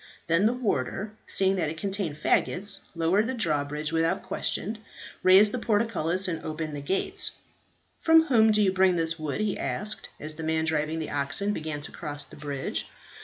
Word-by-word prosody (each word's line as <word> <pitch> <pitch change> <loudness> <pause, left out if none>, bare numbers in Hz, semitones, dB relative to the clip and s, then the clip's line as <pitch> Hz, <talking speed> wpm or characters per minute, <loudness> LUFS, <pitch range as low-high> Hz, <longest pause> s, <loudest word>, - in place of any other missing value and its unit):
Then 170 +5 +3
the 235 - +1
warder, 210 - -2
seeing 190 0 +2
that 165 -4 0
it 160 - -6
contained 195 -4 -3
faggots, 195 +5 +1 0.2
lowered 175 +7 +2
the 260 - -2
drawbridge 150 -5 -1
without 165 +4 +1
question, 215 +2 -3 0.4
raised 195 +3 +6
the 250 - -3
portcullis, 205 -5 +1
and 165 -3 -3
opened 155 -1 -4
the 145 - -5
gates. 190 +7 -1 0.7
"From 325 0 +6
whom 225 -8 +4
do 210 0 +3
you 190 -2 +2
bring 190 -1 +4
this 165 -1 0
wood?" 155 +5 -3
he 210 -2 -1
asked, 210 +1 +1
as 155 +1 -4
the 165 - -6
man 160 0 0
driving 160 0 0
the 160 - -4
oxen 145 +9 +2
began 155 -4 -4
to 145 - -7
cross 145 -2 -4
the - - -13
bridge. 145 -2 -4
170 Hz, 180 wpm, -27 LUFS, 155-205 Hz, 0.7 s, raised